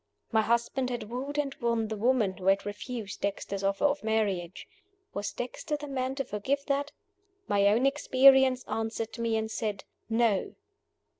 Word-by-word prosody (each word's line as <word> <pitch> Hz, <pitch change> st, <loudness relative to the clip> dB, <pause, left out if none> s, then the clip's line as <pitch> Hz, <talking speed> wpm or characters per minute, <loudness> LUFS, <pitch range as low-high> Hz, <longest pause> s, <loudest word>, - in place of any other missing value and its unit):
My 220 Hz, -1 st, +4 dB
husband 235 Hz, +3 st, 0 dB
had 235 Hz, -3 st, -5 dB
wooed 275 Hz, +4 st, -4 dB
and 285 Hz, -2 st, 0 dB
won 230 Hz, -2 st, +1 dB
the 220 Hz, -, -3 dB
woman 220 Hz, -3 st, +2 dB
who 185 Hz, -, -5 dB
had 195 Hz, +1 st, +3 dB
refused 210 Hz, +1 st, -6 dB
Dexter's 200 Hz, 0 st, -3 dB
offer 195 Hz, +7 st, +1 dB
of 290 Hz, -2 st, +1 dB
marriage. 200 Hz, -5 st, -1 dB, 0.5 s
Was 205 Hz, 0 st, -3 dB
Dexter 255 Hz, +5 st, -4 dB
the 295 Hz, 0 st, -7 dB
man 260 Hz, -1 st, -2 dB
to 275 Hz, -, -1 dB
forgive 265 Hz, +8 st, -2 dB
that? 285 Hz, 0 st, -1 dB, 0.6 s
My 200 Hz, 0 st, +3 dB
own 225 Hz, +6 st, +3 dB
experience 265 Hz, -2 st, +5 dB
answered 225 Hz, 0 st, -3 dB
me, 230 Hz, -1 st, +1 dB
and 220 Hz, 0 st, -2 dB
said, 210 Hz, -3 st, -3 dB, 0.3 s
No. 225 Hz, -3 st, +1 dB
230 Hz, 160 wpm, -29 LUFS, 205-265 Hz, 0.6 s, experience